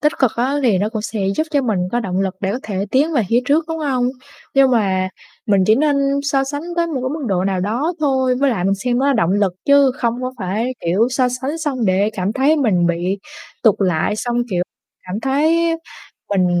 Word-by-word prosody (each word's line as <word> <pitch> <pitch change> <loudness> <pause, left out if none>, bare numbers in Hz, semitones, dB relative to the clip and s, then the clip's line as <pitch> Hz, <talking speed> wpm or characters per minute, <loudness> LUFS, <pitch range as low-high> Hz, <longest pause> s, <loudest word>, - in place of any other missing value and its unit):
tích 300 0 +2
cực 260 -5 +3
á, 255 +4 0
thì 215 -7 +3
nó 205 +2 0
cũng 220 -2 -4
sẽ 220 -2 -4 0.2
giúp 315 - 0
cho 285 -3 +1
mình 215 -6 0
có 240 - +1
động 190 -4 -2
lực 190 -1 -1
để 195 0 -1
có 250 - -2
thể 200 -1 -3
tiến 295 +5 +2
về 245 -6 +2
phía 235 +2 +3
trước, 305 +4 +2
đúng 325 0 -3
hông? 255 -5 0 0.5
Nhưng 270 -1 +5
mà 190 -5 +1 0.4
mình 200 -3 +3
chỉ 215 - +6
nên 290 +2 +2 0.3
so 275 -1 +1
sánh 285 +2 -4
tới 340 0 +2
một 320 - -5
cái 260 - -1
mức 310 -3 -5
độ 185 -2 0
nào 190 -2 0
đó 240 - -1
thôi. 265 -3 +2
Với 280 - +3
lại 190 -7 -1
mình 195 +1 +2
xem 245 +5 -1
nó 275 - +1
là 280 - +4
động 205 -8 +1
lực 200 -2 +1
chứ 280 -2 +5
không 240 0 -1
có 255 - -3
phải, 215 +7 -2
kiểu, 195 +8 +2
so 255 -1 +2
sánh 265 +6 -3
xong 275 -7 -2
để 195 +3 +2
cảm 190 +2 -2
thấy 275 +5 +3
mình 195 - +2
bị 175 +3 -1 0.4
tụt 220 -5 +5
lại, 185 +1 +1
xong, 240 +2 -2
kiểu, 180 -2 +1 0.4
cảm 195 +4 -4
thấy 325 +5 +2 0.5
mình 190 -2 +2
240 Hz, 235 wpm, -19 LUFS, 195-275 Hz, 0.5 s, chỉ